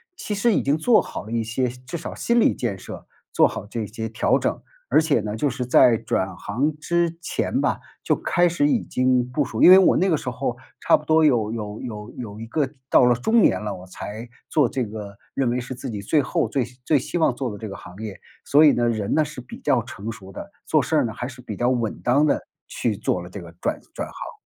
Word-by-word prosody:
其 210 - -4
实 225 +2 +2
已 - - +2
经 140 +2 +1
做 225 +8 +4
好 - - -7
了 110 - -9
一 115 -1 0
些 125 +3 -1
至 125 +5 -7
少 165 - -6
心 235 0 +1
理 - - +4
建 110 -6 -3
设， 95 - -10 0.3
做 - - +5
好 - - -6
这 110 +1 -4
些 110 +1 -5
调 110 - +2
整。 - - -2 0.3
而 - - +5
且 145 -8 +2
呢， 105 +1 -4
就 145 +4 +1
是 125 -1 -3
在 120 -1 +6
转 95 -3 -2
行 140 +9 -2
之 170 +1 0
前 - - -1
吧， - - 0 0.2
就 - - +2
开 175 0 +2
始 145 -4 +1
已 - - +2
经 130 -1 +1
部 145 +1 0
署， 110 - -1
因 180 - +10
为 190 - +10
我 190 - +5
那 190 +1 +2
个 160 - +3
时 125 - -4
候 125 -1 -3 0.2
差 - - +5
不 150 - -13
多 160 0 +4
有 120 -8 +3
有 105 -2 -5
有 105 -2 -7
有 110 -4 -7
一 115 - -5
个 140 +3 0 0.2
到 - - +6
了 125 -1 +4
中 220 - +3
年 - - +4
了， 105 - -3
我 90 +1 -10
才 110 +5 -7 0.2
做 145 -5 +3
这 130 +2 -2
个， 105 -1 -8 0.2
认 130 -3 0
为 125 +1 -1
是 125 +2 -6
自 130 +1 -7
己 105 -3 -5
最 150 +8 +2
后 165 +4 0
最 130 -4 0 0.2
最 150 -3 +3
希 175 - -4
望 160 -6 +3
做 125 0 -3
的 105 - -7
这 110 0 -7
个 100 - -7
行 90 - -12
业。 105 -3 -7 0.2
所 150 +2 +5
以 145 - +7
呢， 120 0 +1
人 110 0 -1
呢 155 - +4
是 150 -3 -8
比 125 - -10
较 - - +2
成 105 +4 -7
熟 100 -4 -11
的， 200 - -9
做 155 -3 +2
事 160 - 0
儿 - - +3
呢， 110 - -4
还 120 - -5
是 125 0 -9
比 110 -4 -6
较 120 +4 +1
稳 120 -4 -1
当 140 +5 +3
地 - - +3 0.3
去 110 -4 -2
做 90 -4 -1
了 90 - -9
这 100 - -8
个 85 - -10
转 - - -1 0.2
转 - - -3
行。 - - -8
125 Hz, 275 characters per minute, -23 LUFS, 110-150 Hz, 0.3 s, 因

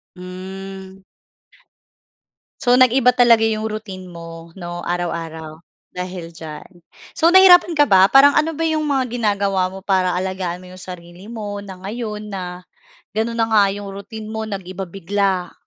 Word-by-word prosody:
Mm. 190 +1 -9 1.6
So 245 -1 +3
nag-iba 250 0 +5
talaga 235 -2 +5
iyong 220 0 -1
routine 195 -4 -7
mo 165 -1 -10
'no, 175 -1 -6
araw-araw 165 -2 -4 0.3
dahil 180 -2 -6
diyan. 160 -1 -9 0.5
So, 330 - +4
nahirapan 355 -2 +7
ka 295 -1 +4
ba? 190 -1 +7
Parang 280 +2 +6
ano 320 +2 +2
ba 320 - -6
iyong 315 -1 0
mga 270 -3 +1
ginagawa 200 -4 +1
mo 195 - -8
para 185 -2 +1
alagaan 185 -1 -3
mo 180 - -13
iyong 185 - -12
sarili 175 0 -10
mo 210 -2 -6
na 195 -2 -9
ngayon 210 0 -5
na 180 -2 -6 0.5
ganoon 230 +2 -2
na 225 - +2
nga 215 -2 +5
iyong 205 0 -7
routine 205 +2 -8
mo 220 0 -4
nag-iba 190 -2 -6
bigla? 195 0 -1
195 Hz, 150 wpm, -20 LUFS, 180-225 Hz, 1.6 s, nahirapan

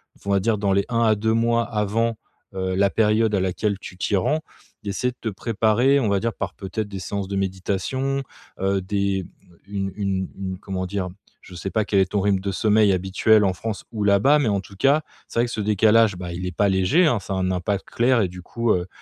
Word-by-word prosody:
v - - -25
on - - -4
va 100 0 +3
dire, 110 +3 +1
dans 100 -1 0
les 100 0 +2
1 115 -1 0
à 110 -2 +4
2 110 +2 0
mois 115 +1 +2
avant, 115 +1 -1 0.4
heu, 95 -1 -2
la 100 +1 +3
période 110 +2 +2
à 95 - +1
laquelle 95 +2 -1
tu 90 - -10
t'y 100 - 0
rends, 150 +12 +1 0.4
d'essayer 105 +5 -1
de 125 - -21
te - - -6
préparer, 115 +6 +2
on 125 - 0
va 100 -1 +1
dire, 115 +1 0
par - - -5
peut-être 100 +2 -4
des 100 -2 -6
séances 100 +1 -4
de 100 - -4
méditation, 100 +9 -2 0.4
heu, 95 0 +1
des, 100 0 0
hem, 95 - -7 0.4
une 100 -1 -3
une 95 -2 -2
une, 95 -1 -4
comment 95 -2 -4
dire, 95 0 -3
hem, 90 - -11 0.3
je 90 - -14
sais 90 +3 -4
pas, 110 +2 +1
quel 100 -1 +1
est 95 -1 +1
ton 100 - +2
rythme 100 -1 +2
de 100 +1 -3
sommeil 105 0 +3
habituel 95 +4 +3
en 95 - +3
France 110 +2 -5
ou 110 -2 -3
là-bas, 105 +10 +5
mais 145 - +1
en 100 -2 +1
tout 100 - -14
cas, 140 +8 +3 0.3
c'est - - -3
vrai 120 - +4
que - - -7
ce 110 - -4
décalage, 105 0 +4
bah, 90 -1 -6
il 90 +2 -5
est 90 -1 -5
pas 100 -1 +3
léger, 95 - +3
hein. 120 -7 +2
Ça 95 +1 -5
a - - -1
un 95 0 0
impact 95 +2 -1
clair 120 0 +2
et 95 - 0
du 90 0 -10
coup, 115 +4 -1
heu, 90 0 -1
100 Hz, 250 wpm, -23 LUFS, 95-115 Hz, 0.4 s, là-bas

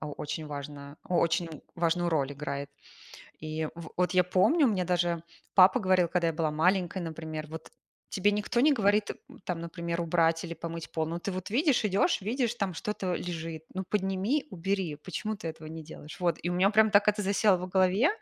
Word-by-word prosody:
о 150 - -5
очень 155 +2 -5
важно, 145 0 -7
очень 170 -3 0
важную 175 +1 +1
роль 145 -3 0
играет. 140 0 -5 0.7
И 155 0 -3
в 170 -1 -9
вот 180 0 +1
я 180 -1 +4
помню, 230 - +4
мне 195 -6 +1
даже 175 -1 +1 0.3
папа 190 +6 +7
говорил, 185 -3 +3
когда 170 -1 +1
я - - 0
была 160 -1 0
маленькая, 180 +4 +1
например, 160 -1 -5
вот: 160 +1 -9 0.4
"Тебе 205 +2 +2
никто 210 +3 0
не 300 +3 +5
говорит, 210 -4 +2 0.3
там, 175 -2 -3
например, 170 0 -4
убрать 165 -1 +2
или 170 -1 -5
помыть 165 0 -6
пол, 160 -1 -1
но 170 +2 -3
ты 200 - -3
вот 185 +1 -5
видишь, 265 0 +2
идешь, 195 -1 +2
видишь, 240 +3 0
там 200 -5 -2
что-то 190 0 -2
лежит. 165 -2 -5
Ну, 190 0 -3
подними, 200 +8 0
убери, 185 -3 -2
почему 200 +7 -4
ты 170 -5 -6
этого 160 -1 -8
не 160 -1 -8
делаешь?" 150 -1 -10
Вот. 175 -1 +1
И 175 - -1
у 175 - -1
меня 190 +3 +4
прям 220 0 +5
так 205 +1 +5
это 210 0 +2
засело 200 0 +3
в 185 +1 -5
голове, 190 - +3
175 Hz, 195 wpm, -29 LUFS, 160-200 Hz, 0.7 s, папа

